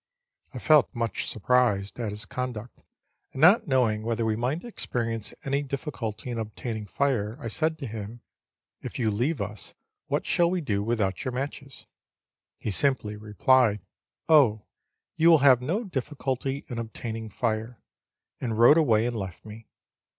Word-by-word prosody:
I - - -8
felt 155 -2 +4
much 115 -1 -2
surprised 110 -2 +1
at 115 -3 -2
his 105 +1 -6
conduct, 120 0 -5 0.5
and 135 - -5
not 195 +8 +6
knowing 120 -6 +2
whether 115 +1 -1
we 110 -1 +1
might 125 +9 -2
experience 115 - -3
any 140 +1 0
difficulty 130 -5 -5
in 115 - -3
ob 110 -1 -6
taining 110 -4 -5
fire, 120 -5 0
I 115 - -5
said 160 +6 0
to 140 - -6
him, 110 0 -7 0.3
" - - -64
If - - -6
you 115 -4 +1
leave 125 +8 0
us, 105 -1 -6 0.3
what - - -1
shall 170 -1 +3
we 180 +1 0
do 105 -11 -1
without 110 0 -1
your 130 -3 -3
matches 135 +1 -6 0.4
?" - - -66
He 110 - -1
simply 110 -2 0
replied, 105 +1 +2 0.3
" - - -67
Oh, 130 -10 +5 0.5
you 165 +1 +5
will 165 - +8
have 130 -3 +7
no 175 - -1
difficulty 135 - -3
in 120 -2 -5
obtaining 115 -1 -5
fire," 110 +2 -2 0.6
and 115 -4 -2
rode 120 +7 +7
away 115 -7 +3
and 120 0 -2
left 95 -3 -6
me. 110 +1 -11
120 Hz, 165 wpm, -27 LUFS, 110-135 Hz, 0.6 s, will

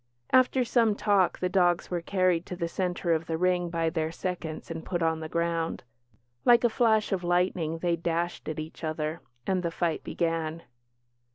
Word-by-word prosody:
After 255 0 +4
some 230 -3 +3
talk, 200 -3 +2
the 180 - 0
dogs 180 -2 +2
were 175 -1 -1
carried 180 -1 +1
to 180 - -5
the 170 -1 -2
centre 175 -1 -1
of 160 0 -1
the 160 - -1
ring 180 0 +1
by 165 -1 0
their 160 -1 -1
seconds 170 -2 -5
and 165 -1 -5
put 175 -2 -2
on 160 -1 +1
the 160 0 -6
ground. 170 0 -1 0.6
Like 240 0 +6
a 240 - +5
flash 220 -2 +2
of 185 -2 -1
lightning 175 -2 +1
they 170 0 +1
dashed 170 +1 -2
at 155 - -4
each 155 +2 -7
other, 155 +1 -2 0.2
and 190 -1 +1
the 170 - -1
fight 165 -1 -1
began. 165 -1 -2
170 Hz, 185 wpm, -28 LUFS, 165-185 Hz, 0.6 s, Like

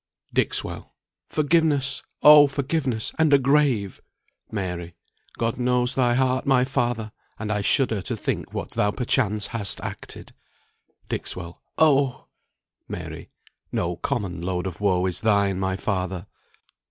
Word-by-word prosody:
"Dixwell. - - 0 0.3
Forgiveness! 150 -3 +1 0.2
Oh, 150 -1 +9
forgiveness, 135 -4 -1
and 160 -2 +4
a 140 - +8
grave! 135 -7 +1 0.5
Mary. 90 -4 -4 0.4
God 115 +1 -1
knows 125 +1 +1
thy 120 -2 +2
heart, 130 0 +1
my 130 -2 +4
father! 120 -5 -1 0.3
and 105 -1 -4
I 105 -1 0
shudder 110 -1 +2
To - - -3
think - - -3
what - - -5
thou 105 - +1
perchance 105 -3 0
hast 105 -4 0
acted. - - -7 0.7
Dixwell. 85 -1 -4 0.2
Oh! 140 -4 +3 0.6
Mary. - - -7 0.4
No 85 0 -1
common 100 -8 -3
load 90 0 -2
of 95 +1 -6
woe 95 -3 +2
is 90 -1 0
thine, 100 -3 +2
my 95 0 -1
father." 95 -3 -2
115 Hz, 130 wpm, -24 LUFS, 95-135 Hz, 0.7 s, Oh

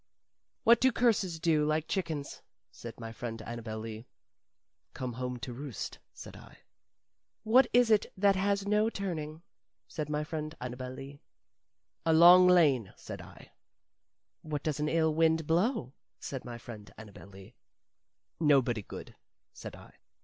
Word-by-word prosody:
"What 235 0 +6
do 260 0 +5
curses 215 -8 +1
do, 160 -2 +2
like 155 +1 0
chickens?" 160 -7 -3 0.3
said 115 0 -10
my 115 -1 -7
friend 115 0 -6
Annabel 115 -1 -6
Lee. 110 +1 -8 0.9
"Come 125 -2 -4
home 125 +1 -4
to 125 - -5
roost," 135 -2 -6
said - - -11
I. - - -14 0.9
"What 250 +5 +5
is 245 -1 +4
it 210 -1 +4
that 200 0 +4
has 200 +1 0
no 210 +2 +3
turning?" 165 -6 -5 0.4
said 150 -2 -5
my 150 0 -1
friend 155 0 -5
Annabel 125 +1 -6
Lee. 135 +2 -10 0.8
"A 165 - +3
long 175 +3 +8
lane," 145 - +4
said - - -8
I. - - -14 0.9
"What 150 -2 -4
does 150 -2 -2
an 150 0 0
ill 160 -1 +2
wind 160 0 +2
blow?" 170 - 0 0.3
said 135 -2 -6
my 120 -1 -6
friend 110 -4 -10
Annabel 105 -3 -12
Lee. 100 +3 -14 0.9
"Nobody 135 -8 +3
good," - - -10 0.4
said - - -9
I. - - -15
150 Hz, 145 wpm, -30 LUFS, 125-180 Hz, 0.9 s, long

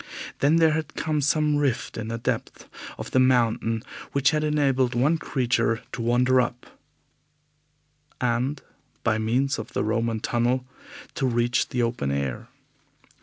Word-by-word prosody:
Then 145 +3 +4
there 165 -1 +5
had 155 -1 -3
come 155 -1 -1
some 150 +1 +2
rift 140 -5 -1
in 110 -1 -4
the 115 +1 -3
depths 115 - -3 0.3
of - - -7
the 130 - +3
mountain 115 -3 +2 0.3
which 140 -1 +3
had 155 0 0
enabled 135 -5 +1
one 145 +7 +2
creature 120 -5 0
to 120 - -5
wander 125 +2 +3
up 120 0 -4 1.5
and, 125 +4 -1 0.4
by 110 0 +1
means 125 +5 0
of - - -8
the - - 0
Roman 115 +1 0
tunnel, 120 +3 0 0.5
to 145 -5 0
reach 120 -1 +1
the 125 -1 0
open 115 - -1
air. 70 -3 -2
125 Hz, 145 wpm, -25 LUFS, 115-140 Hz, 1.5 s, there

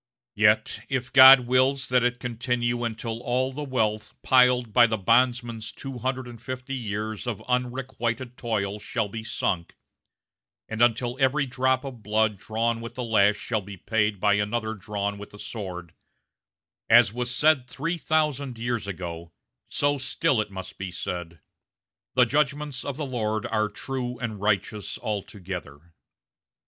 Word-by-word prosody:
Yet, 105 +1 +2
if 130 0 -2
God 130 -1 +10
wills 130 +2 +2
that 125 0 +4
it 125 0 0
continue 120 0 -1
until 115 0 -3
all 130 +2 0
the 150 - -5
wealth 110 -6 -1
piled 125 -3 +4
by 120 0 +7
the 110 -1 -1
bondman's 115 +1 +1
two 135 -2 -7
hundred 130 0 -2
and 120 -2 -11
fifty 130 +1 -6
years 110 -2 -4
of 115 -5 -3
unrequited 125 -1 -2
toil 105 -4 -2
shall 110 0 -2
be 110 +2 -6
sunk, 85 -5 -2 0.9
and 110 +1 -4
until 120 +1 +2
every 135 +2 +2
drop 130 0 +1
of 130 -5 -8
blood 105 -1 +1
drawn 115 +2 -1
with 115 +1 -8
the 125 - -3
lash 105 -3 +4
shall 110 -3 -2
be 100 0 -10
paid 105 +1 0
by 105 +1 +3
another 110 +2 -1
drawn 100 0 -4
with 105 - -9
the 105 - -13
sword, 90 -6 -7 1.0
as 100 - +6
was 125 0 -2
said 140 +1 +3
three 165 +7 -3
thousand 150 -5 0
years 115 -2 -2
ago, 85 -3 -6 0.4
so 145 0 +1
still 135 -1 +1
it 105 - -5
must 95 -1 -8
be 95 -1 -4
said, 85 -2 -6 0.7
'The 125 - +6
judgments 145 +1 -1
of 140 -1 -4
the 150 - -3
Lord 110 -5 -2
are 110 -1 0
true 125 +2 -4
and 110 -4 -5
righteous 105 0 -1
altogether.' 90 -6 -6
115 Hz, 155 wpm, -26 LUFS, 105-130 Hz, 1.0 s, God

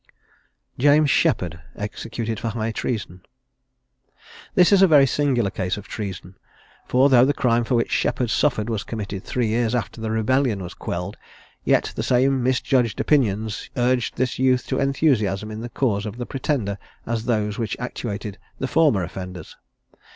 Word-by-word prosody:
JAMES 145 +2 +5
SHEPPARD. 90 - +1 0.2
EXECUTED 110 +1 -4
FOR - - -3
HIGH 110 0 -2
TREASON. 105 -5 -4 1.3
This 180 +1 +5
is 200 -1 +6
a 190 - +8
very 145 -4 +6
singular 130 -7 +1
case 90 0 -2
of 105 - -9
treason; 95 -3 -7 0.5
for 130 +2 +4
though 125 -3 +6
the 140 +2 +2
crime 120 -2 +2
for 120 - 0
which 115 - 0
Sheppard 120 -3 0
suffered 120 -7 +1
was 110 -3 -2
committed 100 -3 -5
three 125 -2 -1
years 115 +1 +1
after 110 -1 -3
the 110 - -2
rebellion 110 -1 +1
was 90 - -7
quelled, 90 +3 -5 0.5
yet - - +2
the - - -2
same 130 +1 +2
misjudged 125 -1 +1
opinions 110 -7 0
urged 125 0 +1
this 125 0 -1
youth 130 -1 +2
to - - 0
enthusiasm 110 -8 +1
in 110 +1 -6
the 120 - -6
cause 110 -4 -1
of 105 +2 -7
the 120 - -4
Pretender 125 -8 -2 0.3
as 115 -1 -2
those 105 -3 0
which 110 -4 -2
actuated 105 -4 -5 0.2
the 135 - -2
former 140 - +3
offenders. 90 -1 -7
115 Hz, 160 wpm, -23 LUFS, 105-130 Hz, 1.3 s, a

